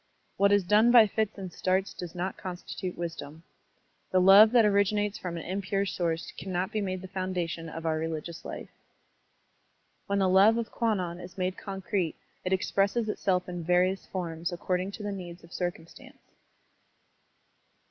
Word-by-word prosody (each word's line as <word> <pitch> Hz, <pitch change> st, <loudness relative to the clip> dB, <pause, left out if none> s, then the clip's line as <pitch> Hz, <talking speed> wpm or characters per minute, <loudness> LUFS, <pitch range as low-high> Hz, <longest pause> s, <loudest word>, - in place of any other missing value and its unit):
What 200 Hz, 0 st, +3 dB
is 205 Hz, -1 st, +4 dB
done 210 Hz, +5 st, +4 dB
by 240 Hz, -2 st, +8 dB
fits 215 Hz, +1 st, -2 dB
and 185 Hz, -3 st, -7 dB
starts 190 Hz, +1 st, 0 dB
does 175 Hz, -2 st, -8 dB
not 180 Hz, +2 st, -3 dB
constitute 180 Hz, 0 st, -6 dB
wisdom. 165 Hz, -2 st, -6 dB, 0.7 s
The 185 Hz, -, +3 dB
love 195 Hz, +4 st, +8 dB
that 235 Hz, -3 st, +5 dB
originates 205 Hz, 0 st, +1 dB
from 175 Hz, -2 st, -5 dB
an 165 Hz, -, -6 dB
impure 195 Hz, +1 st, -1 dB
source 170 Hz, -3 st, -2 dB
cannot 185 Hz, +1 st, -2 dB
be 215 Hz, -, -1 dB
made 185 Hz, -1 st, -3 dB
the -, -, -6 dB
foundation 180 Hz, -3 st, -3 dB
of 165 Hz, 0 st, -7 dB
our 160 Hz, -1 st, 0 dB
religious 160 Hz, +1 st, -4 dB
Ufe. -, -, -7 dB, 1.4 s
When 200 Hz, -, 0 dB
the 195 Hz, -1 st, +3 dB
love 195 Hz, +5 st, +6 dB
of 235 Hz, -1 st, -3 dB
Kwannon 185 Hz, -7 st, -1 dB
is 175 Hz, 0 st, -11 dB
made 185 Hz, 0 st, -1 dB
concrete, 190 Hz, -3 st, -3 dB, 0.3 s
it 185 Hz, -, -2 dB
expresses 200 Hz, +4 st, +1 dB
itself 185 Hz, -3 st, 0 dB
in 175 Hz, -1 st, -5 dB
various 180 Hz, +3 st, +1 dB
forms 170 Hz, -1 st, -4 dB
according 180 Hz, +2 st, -2 dB
to 210 Hz, -, -7 dB
the 205 Hz, -, -2 dB
needs 175 Hz, -3 st, -8 dB
of 170 Hz, -, -16 dB
circtmistance. 175 Hz, -3 st, -6 dB
185 Hz, 160 wpm, -28 LUFS, 175-200 Hz, 1.4 s, by